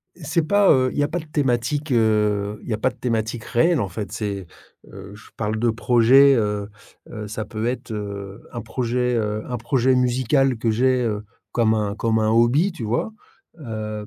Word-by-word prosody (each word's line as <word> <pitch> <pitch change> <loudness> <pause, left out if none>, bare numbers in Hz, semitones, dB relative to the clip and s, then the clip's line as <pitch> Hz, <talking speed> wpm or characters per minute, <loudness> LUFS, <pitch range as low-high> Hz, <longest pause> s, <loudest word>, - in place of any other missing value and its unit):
C'est 170 0 -1
pas, 205 +2 +4
heu, 130 -2 +4
il - - -6
y - - +3
a 145 - +1
pas 175 +2 -3
de - - -11
thématique, 145 0 -1
heu, 105 -3 +1
il - - -12
y 110 - 0
a - - -3
pas 130 - +1
de 125 - -17
thématique 115 -1 -2
réelle 165 +4 +2
en 100 - -1
fait, 100 +3 -6
c'est, 100 -4 -4 0.5
heu, 100 +1 -10
je 110 - -15
parle 110 0 -2
de 120 0 +2
projet, 125 +4 +5
heu 105 -3 -1 0.4
heu, 105 -2 -6
ça 110 +1 -5
peut 110 0 -5
être, 125 -2 -3
heu, 100 0 -6
un 120 - -5
projet, 125 +1 -1
heu, 105 -1 -1
un 125 - -1
projet 130 +2 +1
musical 130 +1 +2
que 115 0 0
j'ai, 125 +3 +2
heu, 105 -2 -2 0.3
comme 115 -2 +2
un 105 -2 -1
comme 110 +1 0
un 110 - +1
hobby 120 - +3
tu 135 -10 -7
vois? 120 - -1 0.5
Heu, 110 -5 -5
115 Hz, 205 wpm, -22 LUFS, 105-130 Hz, 0.5 s, projet